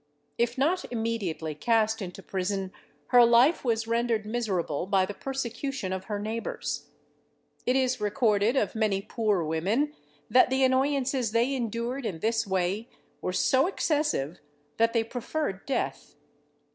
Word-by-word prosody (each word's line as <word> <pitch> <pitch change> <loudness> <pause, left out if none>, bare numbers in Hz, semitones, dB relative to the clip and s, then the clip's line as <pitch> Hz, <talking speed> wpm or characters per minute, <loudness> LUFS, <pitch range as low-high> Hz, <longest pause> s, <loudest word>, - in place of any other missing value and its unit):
If 235 +1 +1
not 335 +8 +2
immediately 220 -9 -2
cast 220 +6 +1
into 190 0 -7
prison, 190 0 -2 0.4
her 245 -1 +7
life 240 +7 +5
was 225 -3 0
rendered 230 -1 0
miserable 195 -8 -1
by 195 -1 +3
the 205 - -6
persecution 270 -4 -3
of 190 0 -4
her 210 -2 -3
neighbours. 220 +3 -4 0.8
It 250 - +3
is 255 -3 +1
recorded 210 +1 +2
of 210 -8 +1
many 210 -3 0
poor 215 -4 0
women, 195 - 0 0.3
that 255 - +5
the 265 +1 +2
annoyances 260 -2 +1
they 235 +4 +2
endured 235 +1 -2
in 175 - -4
this 225 +5 0
way 190 +5 -1 0.3
were - - -1
so 260 - +3
excessive, 295 - 0 0.4
that 230 0 +3
they 230 -2 +2
preferred 235 -2 -4
death. 275 - -3
230 Hz, 140 wpm, -28 LUFS, 195-255 Hz, 0.8 s, her